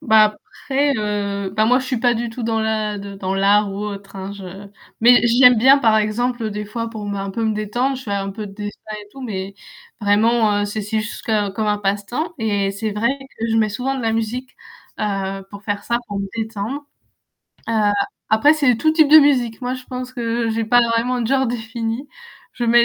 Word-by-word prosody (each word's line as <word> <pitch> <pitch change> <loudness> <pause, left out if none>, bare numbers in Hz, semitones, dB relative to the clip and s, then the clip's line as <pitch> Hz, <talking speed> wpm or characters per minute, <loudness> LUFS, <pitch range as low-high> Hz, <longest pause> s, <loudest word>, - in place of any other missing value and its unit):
Bah 220 -2 +6 0.4
après, 280 +1 +2
heu, 200 -2 -2
bah 215 +2 +1
moi 250 +3 +4
je - - -6
suis 255 - -1
pas 240 0 +2
du 235 +1 -3
tout 235 +1 -7
dans 225 -1 0
la 215 -1 -1
de 200 0 -8
dans 190 0 -2
l'art 200 +1 +3
ou 195 - -6
autre 200 -1 -7
hein, 190 0 -5
je 200 -1 -9 0.6
mais 245 +2 +7
j'y 240 +2 +3
aime 250 -1 +9
bien 265 +5 +6
par 225 -4 +4
exemple 225 +2 0
des 210 0 -4
fois 230 +2 -4
pour 220 -2 -7
me 200 - -3
un 195 0 -4
peu 225 +4 -2
me 220 - +1
détendre, 240 +6 -1
je 260 - -8
fais 205 - -4
un 195 0 -2
peu 210 +1 -6
de 195 - -10
dessin 205 0 -6 0.2
et 205 - -14
tout. 270 - -12
Mais, 195 -4 -5 0.5
vraiment 210 +1 +3
heu - - +1
c'est 210 +1 -3
si 215 +2 -1
juste 225 +2 -7
co 225 - 0 0.2
comme 215 +2 -2
un 210 0 +1
passe-temps 205 - -2
et 205 -3 0
c'est 205 +1 -3
vrai 215 +3 +1 0.3
que 230 - 0
je 225 - +2
mets 215 -1 +3
souvent 255 +6 -2
de 260 - -4
la 225 -1 +1
musique, 235 +4 -2 0.5
heu, 195 -2 -2
pour 200 0 -10
faire 205 0 -2
ça, 235 0 0
pour 200 -1 -4
me 195 - -3
détendre. 225 +5 -4 0.8
Heu, 215 -2 +2 0.4
après 220 +8 +5
c'est 280 -7 +3
tout 310 +6 +2
type 315 -2 +4
de 310 +2 +10
musique. 255 -6 +2
Moi 250 +1 -1
je 255 0 -9
pense 255 0 -6
que 230 -1 -1
j'ai 225 0 -1
pas 245 +2 +5
vraiment 245 +2 0
de 230 - -1
genre 265 0 +2
défini. 230 +2 -4 0.4
Je 240 - -3
mets 235 0 +6
220 Hz, 230 wpm, -20 LUFS, 205-245 Hz, 0.8 s, de